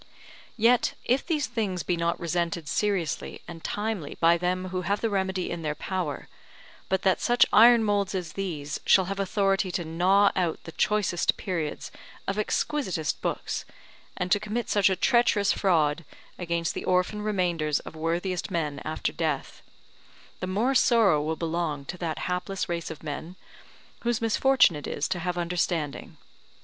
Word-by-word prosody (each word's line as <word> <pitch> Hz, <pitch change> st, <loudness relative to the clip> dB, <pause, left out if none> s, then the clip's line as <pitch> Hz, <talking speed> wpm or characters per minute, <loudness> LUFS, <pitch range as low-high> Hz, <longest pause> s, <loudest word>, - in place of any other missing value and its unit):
Yet 235 Hz, +2 st, +3 dB
if 255 Hz, +3 st, +2 dB
these 310 Hz, -4 st, 0 dB
things 205 Hz, -8 st, -2 dB
be 175 Hz, +4 st, 0 dB
not 170 Hz, 0 st, -1 dB
resented 170 Hz, -1 st, -2 dB
seriously 195 Hz, -5 st, -1 dB
and 165 Hz, -2 st, -9 dB
timely 205 Hz, -8 st, -3 dB
by 170 Hz, 0 st, +5 dB
them 180 Hz, +2 st, -1 dB
who 185 Hz, 0 st, -2 dB
have 200 Hz, +3 st, 0 dB
the 225 Hz, -, -1 dB
remedy 190 Hz, -2 st, -1 dB
in 170 Hz, -, -4 dB
their 150 Hz, -1 st, -2 dB
power, 180 Hz, -6 st, -4 dB, 0.6 s
but 190 Hz, 0 st, 0 dB
that 190 Hz, -2 st, +2 dB
such 240 Hz, 0 st, +4 dB
iron 235 Hz, +1 st, +7 dB
moulds 205 Hz, -2 st, 0 dB
as 175 Hz, -4 st, -4 dB
these 155 Hz, -7 st, -4 dB
shall 190 Hz, -, +5 dB
have 195 Hz, +2 st, -4 dB
authority 195 Hz, -1 st, +1 dB
to 175 Hz, -, -2 dB
gnaw 185 Hz, +5 st, +3 dB
out 175 Hz, -4 st, -1 dB
the 165 Hz, -, -8 dB
choicest 205 Hz, -2 st, +1 dB
periods 165 Hz, -6 st, -3 dB, 0.4 s
of 195 Hz, -, -1 dB
exquisitest 205 Hz, -, -1 dB
books, -, -, -2 dB, 0.5 s
and 180 Hz, 0 st, -2 dB
to 205 Hz, -, +5 dB
commit 215 Hz, +3 st, -3 dB
such 205 Hz, -2 st, +4 dB
a 190 Hz, -, +1 dB
treacherous 220 Hz, -1 st, +3 dB
fraud 165 Hz, -4 st, +2 dB, 0.4 s
against 170 Hz, -2 st, -1 dB
the -, -, -5 dB
orphan 185 Hz, +3 st, +1 dB
remainders 175 Hz, -8 st, 0 dB
of -, -, -10 dB
worthiest 170 Hz, +3 st, -2 dB
men 150 Hz, -4 st, -2 dB
after 155 Hz, -, -2 dB
death, 155 Hz, -5 st, -3 dB, 0.8 s
the 185 Hz, -, -3 dB
more 215 Hz, +8 st, +1 dB
sorrow 225 Hz, -, +4 dB
will 160 Hz, +2 st, -1 dB
belong 160 Hz, -4 st, -2 dB
to 180 Hz, -, -6 dB
that 165 Hz, -3 st, -3 dB
hapless 180 Hz, +2 st, -2 dB
race 170 Hz, -1 st, -3 dB
of 160 Hz, -1 st, -9 dB
men, 160 Hz, +4 st, -6 dB, 0.6 s
whose 235 Hz, -1 st, 0 dB
misfortune 230 Hz, -, +4 dB
it 145 Hz, -, -6 dB
is -, -, -2 dB
to 185 Hz, -1 st, -2 dB
have 180 Hz, 0 st, -2 dB
understanding. 170 Hz, -3 st, -2 dB
180 Hz, 160 wpm, -27 LUFS, 165-205 Hz, 0.8 s, iron